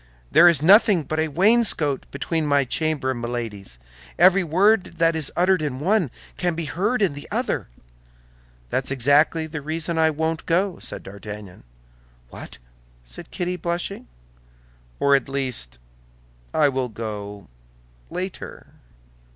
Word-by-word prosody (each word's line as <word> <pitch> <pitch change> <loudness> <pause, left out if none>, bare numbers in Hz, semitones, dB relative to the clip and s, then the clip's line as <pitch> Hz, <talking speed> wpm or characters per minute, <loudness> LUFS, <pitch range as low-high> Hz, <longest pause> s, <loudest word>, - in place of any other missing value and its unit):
"There 175 - +7
is 160 -4 +4
nothing 195 -1 +6
but 155 +2 -3
a 160 - +1
wainscot 175 - +2
between 155 +2 -2
my 140 -1 +3
chamber 150 -1 -1
and 120 -2 -5
Milady's; 115 - -5 0.4
every 185 +2 +5
word 185 +3 +2
that 165 0 +2
is 155 -3 -1
uttered 185 0 +2
in 140 -4 -3
one 185 - +1 0.3
can 175 -2 -1
be 165 0 -3
heard 205 - 0
in 185 - +1
the 145 - -9
other." - - -2 1.0
"That's 130 - -1
exactly 145 +5 +3
the 160 -1 -6
reason 160 +2 -2
I 160 0 +4
won't 160 +1 -3
go," 180 +2 0
said - - -8
D'Artagnan. 100 - -10 0.6
"What!" - - -10 0.5
said - - -11
Kitty, 180 0 -3
blushing. 175 +3 -4 0.9
"Or, 140 0 +4
at 135 -1 -1
least, 125 - -3 0.7
I 155 -2 +3
will 130 -2 -1
go—later." 100 - -9
155 Hz, 135 wpm, -23 LUFS, 125-175 Hz, 1.0 s, There